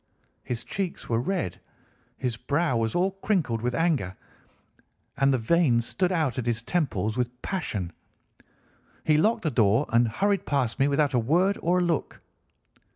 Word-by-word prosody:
His 120 -2 -4
cheeks 195 -3 -4
were 115 -1 +2
red, 175 - -2 0.6
his 125 -3 -2
brow 145 +4 0
was 115 -1 0
all 185 +2 +2
crinkled 185 - -1
with 125 +1 -1
anger, 150 - 0 1.0
and 135 0 +3
the 130 - +2
veins 120 -1 +2
stood 185 +8 0
out 155 -9 0
at 120 - -4
his 115 -1 0
temples 120 - -1
with 125 0 -2
passion. 105 - -3 1.1
He 155 - +3
locked 220 +8 +2
the 155 - 0
door 115 +3 +3
and 115 +1 +3
hurried 200 - 0
past 135 -5 0
me 135 - +4
without 145 0 +1
a 125 - +3
word 175 - +2
or 175 +2 +2
a 180 - +2
look. 170 -3 -1
135 Hz, 160 wpm, -26 LUFS, 115-175 Hz, 1.1 s, me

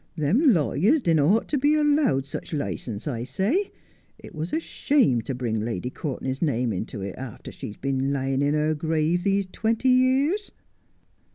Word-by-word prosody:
Them 205 - +3
lawyers 205 - +2
didn't 165 -2 +3
ought 225 +2 +2
to 290 - +1
be 290 +3 +3
allowed 290 - +2
such 140 - -7
licence, 125 -5 -4
I 120 -5 -2
say. 200 - 0 0.5
It - - -13
was 160 +1 -4
a 315 - +1
shame 265 - +1
to 125 +4 -4
bring 115 -4 -2
Lady 115 +1 -3
Courtenay's 135 -2 -4
name 125 -7 0
into 100 +1 -5
it, 95 -1 -4
after 130 -4 -8
she's 105 - -8
been 135 0 -1
lying 135 -1 -1
in 145 +1 +2
her 155 +1 +1
grave 160 +2 0
these 200 0 +1
twenty 230 +3 0
years.' 265 +10 +2
155 Hz, 170 wpm, -25 LUFS, -, 0.5 s, Them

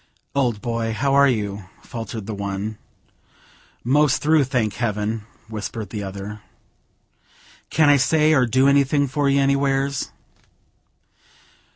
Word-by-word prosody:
"Old 120 -7 0
boy, 115 -2 -2
how 135 +4 0
are 140 0 +6
you?" 105 -5 -2 0.2
faltered 115 -3 -6
the 110 - -5
one. 100 +1 -4 1.0
"Most 140 +3 +3
through, 150 -1 +3
thank 120 -5 -1
heaven!" 110 -2 -2 0.2
whispered 110 0 -6
the 105 - -4
other. 100 +2 -7 1.3
"Can 155 -2 +3
I 145 0 +6
say 155 +3 +3
or 130 -4 +3
do 130 +4 +3
anything 140 +1 +3
for 140 +2 0
you 140 0 +3
anywheres?" 140 0 +1
125 Hz, 125 wpm, -22 LUFS, 105-140 Hz, 1.3 s, are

